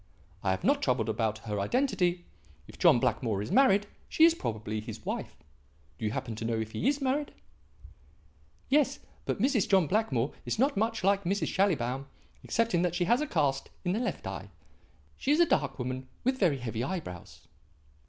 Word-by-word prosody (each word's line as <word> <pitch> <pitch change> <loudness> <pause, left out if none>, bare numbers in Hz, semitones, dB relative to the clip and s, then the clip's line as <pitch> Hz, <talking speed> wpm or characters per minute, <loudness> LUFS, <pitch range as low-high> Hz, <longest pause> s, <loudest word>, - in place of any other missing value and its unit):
I 95 - -1
have 95 0 -1
not - - +3
troubled 120 -3 +1
about 110 0 0
her 105 -2 -2
identity. 180 - +1 0.4
If - - -14
John - - +6
Blackmore 115 -4 0
is 105 - -6
married, 205 -7 +5 0.2
she 320 - +3
is 335 - +6
probably 110 - -4
his 110 -1 -9
wife. - - -4 0.6
Do - - -3
you 105 - 0
happen 120 0 -4
to 110 - -5
know 115 0 0
if 110 0 -4
he 230 - -1
is 285 +1 +1
married?" 280 +2 0 1.4
"Yes; 280 0 +3 0.3
but - - -2
Mrs. 245 -2 +2
John 190 -4 +5
Blackmore 145 - 0
is - - -2
not 270 +4 +2
much 225 0 0
like 200 +1 +3
Mrs. 195 +3 0
Schallibaum, 135 -9 0 0.4
excepting 225 -6 +1
that 175 -1 0
she 175 - +1
has 240 +9 +3
a 300 - -1
cast 140 - 0 0.2
in 175 - +1
the 205 - 0
left 245 - -3
eye. - - -6 0.7
She - - -3
is 300 - +4
a 345 - +7
dark 140 - 0
woman 130 0 -4 0.2
with 260 +1 +1
very 170 -8 +3
heavy 120 -2 -3
eyebrows." 135 - -6
175 Hz, 185 wpm, -29 LUFS, -, 1.4 s, a